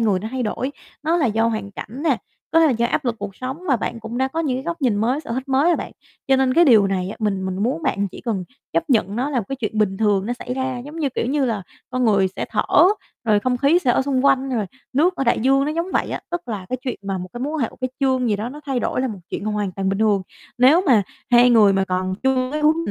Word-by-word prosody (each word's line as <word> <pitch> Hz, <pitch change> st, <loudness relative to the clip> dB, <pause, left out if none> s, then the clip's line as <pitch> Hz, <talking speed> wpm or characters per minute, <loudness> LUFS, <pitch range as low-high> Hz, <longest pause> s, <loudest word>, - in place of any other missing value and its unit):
người 210 Hz, -5 st, +2 dB
nó 220 Hz, -, -5 dB
thay 260 Hz, -1 st, -2 dB
đổi, 255 Hz, +4 st, -2 dB, 0.3 s
nó 325 Hz, +2 st, +2 dB
là 310 Hz, -6 st, +2 dB
do 225 Hz, 0 st, +1 dB
hoàn 215 Hz, -3 st, -2 dB
cảnh 220 Hz, +6 st, -8 dB
nè, 290 Hz, -6 st, +3 dB, 0.3 s
có 330 Hz, -, +4 dB
thể 325 Hz, -, +6 dB
là 290 Hz, -, +3 dB
do 235 Hz, 0 st, +1 dB
áp 295 Hz, -, -1 dB
lực 240 Hz, -2 st, 0 dB
cuộc 200 Hz, -1 st, -6 dB
sống 260 Hz, +5 st, -5 dB
và 265 Hz, -, +4 dB
bạn 230 Hz, 0 st, -4 dB
cũng 225 Hz, +2 st, -5 dB
đã 265 Hz, 0 st, +1 dB
có 325 Hz, +4 st, -3 dB
những 270 Hz, -6 st, 0 dB
cái 265 Hz, -, -4 dB
góc 340 Hz, -2 st, -4 dB
nhìn 235 Hz, -6 st, +2 dB
mới, 245 Hz, +7 st, +1 dB
sở 285 Hz, -, -10 dB
thích 260 Hz, +3 st, -4 dB
mới 270 Hz, +2 st, +3 dB
rồi 350 Hz, -, +4 dB
bạn. -, -, -6 dB, 0.4 s
Cho 265 Hz, -, +5 dB
nên 260 Hz, -1 st, +2 dB
cái 340 Hz, +3 st, +6 dB
điều 220 Hz, -8 st, +6 dB
này 185 Hz, -1 st, -1 dB
á, -, -, -7 dB
mình 195 Hz, -3 st, -1 dB
mình 190 Hz, +2 st, -3 dB
muốn 275 Hz, +8 st, -1 dB
bạn 200 Hz, -9 st, 0 dB
chỉ -, -, -11 dB
cần 210 Hz, -6 st, -2 dB, 0.3 s
chấp 330 Hz, -3 st, -1 dB
nhận 210 Hz, -4 st, +2 dB
nó 265 Hz, +5 st, -1 dB
là 265 Hz, -, 0 dB
một 225 Hz, -, -2 dB
cái 270 Hz, -, -3 dB
chuyện 220 Hz, -3 st, -3 dB
bình 195 Hz, -2 st, +1 dB
thường 205 Hz, -2 st, +1 dB
nó 240 Hz, -, -1 dB
xảy 245 Hz, 0 st, -5 dB
ra, 260 Hz, -1 st, -2 dB
giống 300 Hz, +3 st, -9 dB
như, 295 Hz, -4 st, +1 dB
kiểu 235 Hz, -, -2 dB
như 280 Hz, +2 st, +1 dB
là, 220 Hz, -6 st, -1 dB, 0.3 s
con 255 Hz, -1 st, 0 dB
người 200 Hz, -4 st, +3 dB
sẽ -, -, -2 dB
thở, -, -, 0 dB, 0.6 s
rồi 210 Hz, -2 st, +3 dB
không 250 Hz, +1 st, 0 dB
khí 280 Hz, +7 st, +4 dB
sẽ 265 Hz, -8 st, +1 dB
ở 265 Hz, -, +2 dB
xung 270 Hz, -1 st, 0 dB
quanh, 270 Hz, -1 st, +3 dB
rồi 225 Hz, -5 st, -1 dB, 0.3 s
nước 340 Hz, +7 st, +2 dB
ở 270 Hz, -, -1 dB
đại 235 Hz, -, +2 dB
dương, 270 Hz, +3 st, +3 dB
nó 300 Hz, -, -1 dB
giống 335 Hz, +3 st, -1 dB
vậy -, -, 0 dB
á. -, -, -3 dB
Tức 345 Hz, -7 st, -4 dB
là 205 Hz, -5 st, -4 dB
cái 255 Hz, -, -1 dB
chuyện 260 Hz, -2 st, -3 dB
mà 195 Hz, -1 st, -3 dB
một 180 Hz, -, -6 dB
cái 240 Hz, -, -7 dB
mối 290 Hz, +4 st, -2 dB
quan 315 Hz, -, -2 dB
hệ, 225 Hz, -, 0 dB
một -, -, -17 dB
cái 255 Hz, 0 st, -2 dB
chương 260 Hz, -2 st, +2 dB
gì 210 Hz, -, +1 dB
đó 215 Hz, +3 st, -4 dB
nó 290 Hz, +4 st, -9 dB
thay 265 Hz, -3 st, -1 dB
đổi -, -, -1 dB
là 260 Hz, -, 0 dB
một 205 Hz, -4 st, -6 dB
chuyện -, -, -4 dB
hoàn 210 Hz, -3 st, -2 dB
toàn 195 Hz, +1 st, -2 dB
bình 195 Hz, 0 st, -1 dB
thường. 210 Hz, -3 st, +2 dB, 0.4 s
Nếu 275 Hz, +8 st, +6 dB
mà 225 Hz, -6 st, +5 dB, 0.3 s
hai 245 Hz, +1 st, +6 dB
người 215 Hz, -4 st, +6 dB
mà 195 Hz, 0 st, +1 dB
còn 185 Hz, 0 st, -1 dB
chưa 260 Hz, -1 st, +1 dB
cái 305 Hz, -, -1 dB
hướng 310 Hz, +1 st, +4 dB
250 Hz, 305 wpm, -21 LUFS, 210-270 Hz, 0.6 s, thể